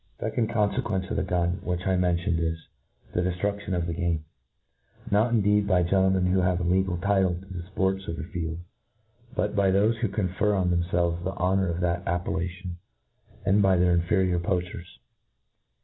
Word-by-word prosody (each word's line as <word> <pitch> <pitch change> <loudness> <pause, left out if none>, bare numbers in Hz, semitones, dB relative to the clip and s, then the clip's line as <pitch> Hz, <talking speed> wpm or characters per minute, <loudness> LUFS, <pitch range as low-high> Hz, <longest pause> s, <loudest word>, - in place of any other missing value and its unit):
The - - -3
fecond 115 -2 0
confequence 105 -3 0
of - - -1
the - - +2
gun 90 0 0
which^ 90 0 -2
I 95 -1 +2
mentioned 90 -1 +1
is, 80 0 -1 0.6
the - - +1
deflruSion 100 +2 -2
of 85 -1 -1
the 85 - -2
game 85 -3 -1 0.8
j. - - -11
not 110 +4 +3
indeed 105 -2 +3
by 90 -3 +3
gentlemen 95 +1 +2
who 90 +1 +2
have 90 -1 +1
a - - -2
legal 90 0 +1
title 95 -1 +2
ta 90 +2 -10
the 90 -2 -5
fports 95 0 0
of 85 - -3
tlie - - -5
afield, 85 -4 -4 0.8
but 105 0 -1
by 100 -2 +3
thofe 105 +4 +3
who 115 0 0
confer 100 +1 0
on 90 -2 +1
themfelves 85 0 0
the 95 +2 -2
honour 95 +1 +1
of 85 +1 -2
that 90 0 0
appellation, 90 +1 -3 0.7
and 100 +3 +4
by 95 -1 +4
inferior 90 +1 +2
poachers. 90 +1 -3
90 Hz, 180 wpm, -26 LUFS, 85-100 Hz, 0.8 s, and